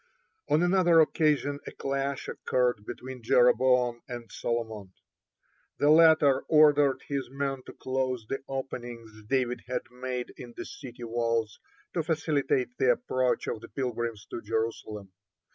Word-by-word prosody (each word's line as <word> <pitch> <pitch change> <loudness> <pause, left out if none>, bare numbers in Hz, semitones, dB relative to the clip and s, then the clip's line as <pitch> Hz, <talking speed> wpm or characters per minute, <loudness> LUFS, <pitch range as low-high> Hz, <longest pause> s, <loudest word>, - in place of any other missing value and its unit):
(1) 155 +3 +3
On - - +4
another 175 -2 +5
occasion 150 -2 +2
a - - -5
clash 135 0 -3
occurred 120 -4 0
between 130 -1 -7
Jeroboam 125 +1 +3
and 120 -3 -8
Solomon. 110 -5 -4 0.8
The 145 - +4
latter 155 -4 +6
ordered 145 -3 +5
his 140 -3 -3
men 135 0 -3
to - - -9
close 130 -3 -2
the 135 - -3
openings 120 -4 -6 0.2
David 125 -1 0
had 125 0 -2
made 125 0 -5
in 120 -1 -10
the - - -5
city 120 -3 -10
wall 115 -1 0 0.5
to 170 - +1
facilitate 145 -6 0
the 130 - +5
approach 130 +1 -1
of 110 - -4
the - - -11
pilgrims 120 -4 -3
to 115 - -5
Jerusalem. 110 -2 -3
130 Hz, 140 wpm, -28 LUFS, 120-140 Hz, 0.8 s, latter